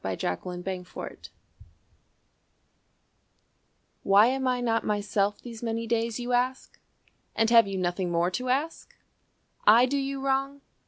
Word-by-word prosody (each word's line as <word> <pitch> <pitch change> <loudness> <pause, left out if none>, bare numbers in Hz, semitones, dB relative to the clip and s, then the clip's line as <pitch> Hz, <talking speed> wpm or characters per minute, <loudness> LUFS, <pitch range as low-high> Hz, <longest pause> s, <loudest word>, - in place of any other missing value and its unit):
An 95 - -2
Evangelist's 180 - -5
Wife - - -8 2.7
"Why 200 +2 +5
am 265 +2 0
I 250 -1 +1
not 230 -2 0
myself 205 -1 -1
these 230 -2 -10
many 230 -1 -3
days, 230 0 -1
You 245 0 -3
ask? 255 +2 -1 0.6
And 225 0 +2
have 230 -3 +7
you 195 -1 -4
nothing 180 0 -1
more 170 +1 +1
to 250 +6 -3
ask? 290 +6 -2 0.7
I 230 +4 +7
do 275 +3 -1
you 275 0 -3
wrong? 275 +1 -1
230 Hz, 130 wpm, -27 LUFS, 195-255 Hz, 2.7 s, have